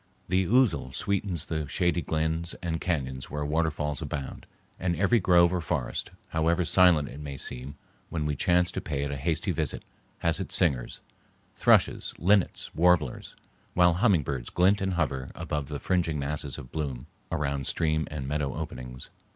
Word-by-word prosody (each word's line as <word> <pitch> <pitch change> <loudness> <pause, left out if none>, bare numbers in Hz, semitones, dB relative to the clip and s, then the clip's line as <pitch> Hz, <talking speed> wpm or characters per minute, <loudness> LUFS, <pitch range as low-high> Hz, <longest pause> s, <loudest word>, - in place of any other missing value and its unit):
The 95 0 +2
ousel 120 - +3
sweetens 95 -5 -1
the 80 -3 -3
shady 85 +3 +1
glens 80 +2 -1
and 80 -1 -2
cañons 65 -7 -2
where 75 0 -4
waterfalls 75 -2 -1
abound, 70 -3 -5 0.3
and 90 -1 0
every 100 +6 +3
grove 90 -2 +5
or 90 - 0
forest, 80 - -2 0.2
however 85 +2 +1
silent 85 -5 +5
it 70 - -9
may 70 -2 -6
seem 65 +3 -6 0.3
when 80 -3 -2
we 75 -1 0
chance 90 +4 +2
to - - -4
pay 70 -3 -2
it 70 - -2
a - - -2
hasty 80 +4 -1
visit, - - -1 0.3
has 85 +1 +1
its 95 - -1
singers,—thrushes, 70 -10 0
linnets, 95 +2 +2
warblers,—while 90 +1 +1
hummingbirds 80 - +1
glint 95 +3 +3
and 95 -1 0
hover 70 -6 -1
about 75 -2 -3
the 75 0 -4
fringing 85 -2 0
masses 70 -1 -2
of 65 - -10
bloom 70 -6 -4 0.3
around 70 -2 -1
stream 80 -2 0
and 70 -3 -5
meadow 75 -1 -1
openings. 65 -5 -7
80 Hz, 155 wpm, -28 LUFS, 70-90 Hz, 0.3 s, grove